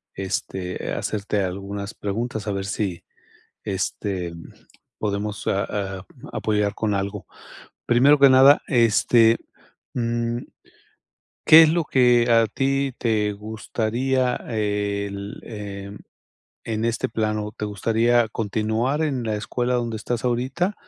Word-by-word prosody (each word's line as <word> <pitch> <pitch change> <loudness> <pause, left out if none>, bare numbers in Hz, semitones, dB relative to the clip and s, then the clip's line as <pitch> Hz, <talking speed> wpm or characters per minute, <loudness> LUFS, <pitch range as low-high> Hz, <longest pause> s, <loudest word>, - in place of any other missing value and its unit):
este, 95 -1 -4
hacerte 105 -1 -2
algunas 100 +2 -5
preguntas 110 +1 -4
a 105 - 0
ver 100 0 -3
si, 100 -3 -3 0.6
este, 95 -2 -3 0.7
podemos 105 -1 -3
a 100 0 -1
a 95 - -13
mm, - - -12
apoyar 105 -1 0
con 105 -2 -1
algo. 100 0 -4 0.6
Primero 135 +5 +5
que 140 0 +8
nada, 135 +2 +7
este, 115 -1 +4 0.6
mm, 120 0 -1 1.1
¿qué 160 +1 +10
es 155 - +4
lo 165 -1 +1
que 125 -3 +4
a 115 -1 +5
ti 135 +3 0
te 105 -3 +1
gustaría 115 +4 -1
el, 100 -2 -3
em, 100 -2 -7 0.7
en 110 0 -2
este 115 0 -1
plano, 105 -1 -2
te - - -4
gustaría 115 +3 +2
continuar 110 +7 -1
en 135 -6 -1
la 110 -1 -1
escuela 125 +4 -2
donde 120 -2 -1
estás 115 +3 -3
ahorita 130 - 0
110 Hz, 120 wpm, -23 LUFS, 100-120 Hz, 1.1 s, qué